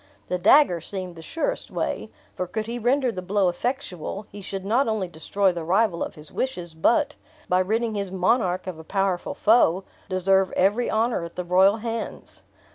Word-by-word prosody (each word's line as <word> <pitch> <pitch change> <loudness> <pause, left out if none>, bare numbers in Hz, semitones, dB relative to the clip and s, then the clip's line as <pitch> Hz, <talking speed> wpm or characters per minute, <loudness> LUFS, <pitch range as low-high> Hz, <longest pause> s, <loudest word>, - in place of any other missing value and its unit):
The 180 - -1
dagger 195 - +5
seemed 185 0 -6
the 165 - -10
surest 330 - -3
way; - - -3 0.2
for 180 - -3
could 215 +4 -3
he 235 +2 -4
render 250 +2 +2
the 185 - -5
blow 190 0 +2
effectual, 200 - -4
he 205 - -9
should 195 0 -5
not 235 +6 +2
only 215 -4 -1
destroy 180 +4 0
the 170 -2 -5
rival 185 +1 +2
of - - -6
his 150 -1 -12
wishes, 180 -11 -3
but, 275 - +2 0.3
by 180 - +3
ridding 220 +4 0
his 200 -2 -2
monarch 185 0 +1
of 180 -4 -6
a - - -9
powerful 195 +1 -1
foe, 200 -5 +4 0.3
deserve 190 0 +2
every 205 +6 +2
honor 225 -3 +1
at 170 - -8
the 180 - -4
royal 190 +4 +5
hands. 230 0 -5
195 Hz, 185 wpm, -24 LUFS, 180-225 Hz, 0.3 s, dagger